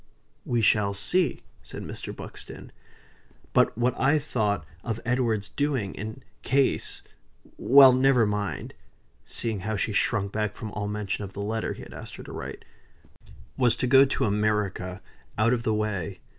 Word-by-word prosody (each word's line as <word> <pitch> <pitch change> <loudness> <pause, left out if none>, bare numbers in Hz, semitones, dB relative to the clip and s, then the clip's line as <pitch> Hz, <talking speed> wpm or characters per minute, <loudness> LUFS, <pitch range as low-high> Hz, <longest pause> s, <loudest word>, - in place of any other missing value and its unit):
"We 120 -1 +1
shall 105 -2 +3
see," 165 - +1 0.2
said - - -8
Mr. - - -6
Buxton. - - -9 0.8
"But - - +3
what 120 +1 +2
I 140 +4 +4
thought 110 - -1 0.2
of 115 -1 -3
Edward's 115 -4 0
doing, 135 -9 -1
in 110 +2 -7 0.2
case 135 +1 0 0.5
Well 135 0 +8
never 130 -2 +4
mind! 105 -1 -3 0.5
(seeing 110 -3 -3
how 110 +3 -2
she 105 +2 -1
shrunk 100 -1 +1
back 105 -1 -2
from 110 -2 -6
all 105 0 -3
mention 105 0 -3
of 100 0 -8
the 100 - -5
letter 110 +2 -2
he - - -10
had - - -11
asked - - -9
her - - -9
to - - -10
write,) - - -7 0.9
was 120 -3 +4
to 125 - -1
go 135 +2 +7
to 135 - 0
America, 105 -3 -1 0.3
out 115 +3 +3
of 120 - 0
the 110 -2 0
way. 105 -6 -2
110 Hz, 160 wpm, -26 LUFS, 105-125 Hz, 0.9 s, Well